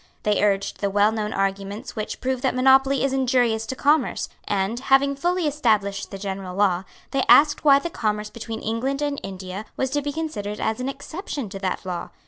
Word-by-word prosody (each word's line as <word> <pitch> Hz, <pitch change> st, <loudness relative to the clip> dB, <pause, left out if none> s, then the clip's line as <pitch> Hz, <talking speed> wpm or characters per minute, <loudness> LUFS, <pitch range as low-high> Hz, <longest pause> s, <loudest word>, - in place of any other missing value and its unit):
They 210 Hz, -1 st, +2 dB
urged 200 Hz, -1 st, +1 dB
the 200 Hz, -, +1 dB
well 205 Hz, +2 st, +3 dB
known 215 Hz, -1 st, -2 dB
arguments 195 Hz, +2 st, -3 dB
which 215 Hz, -2 st, -5 dB
prove 260 Hz, -1 st, -1 dB
that 260 Hz, -2 st, 0 dB
monopoly 265 Hz, +1 st, +4 dB
is 275 Hz, -1 st, +1 dB
injurious 245 Hz, -4 st, +1 dB
to 260 Hz, -, -3 dB
commerce; 290 Hz, 0 st, +1 dB, 0.2 s
and, 200 Hz, +4 st, 0 dB
having 275 Hz, +1 st, +3 dB
fully 350 Hz, +4 st, 0 dB
established 215 Hz, -9 st, +1 dB
the 195 Hz, -, -7 dB
general 190 Hz, -2 st, -5 dB
law, 190 Hz, -2 st, +2 dB, 0.3 s
they 275 Hz, -, +1 dB
asked 295 Hz, 0 st, +6 dB
why 280 Hz, -2 st, +7 dB
the 335 Hz, +4 st, -3 dB
commerce 210 Hz, -4 st, -2 dB
between 225 Hz, -1 st, -6 dB
England 260 Hz, +6 st, -1 dB
and 290 Hz, -1 st, -1 dB
India 190 Hz, +1 st, -6 dB
was 265 Hz, -1 st, -1 dB
to 290 Hz, -, 0 dB
be 290 Hz, 0 st, -3 dB
considered 245 Hz, -10 st, -4 dB
as 220 Hz, +1 st, -1 dB
an 255 Hz, +2 st, -2 dB
exception 285 Hz, -, -6 dB
to 195 Hz, 0 st, -7 dB
that 190 Hz, 0 st, -3 dB
law. 175 Hz, -2 st, -4 dB
225 Hz, 195 wpm, -23 LUFS, 200-275 Hz, 0.3 s, why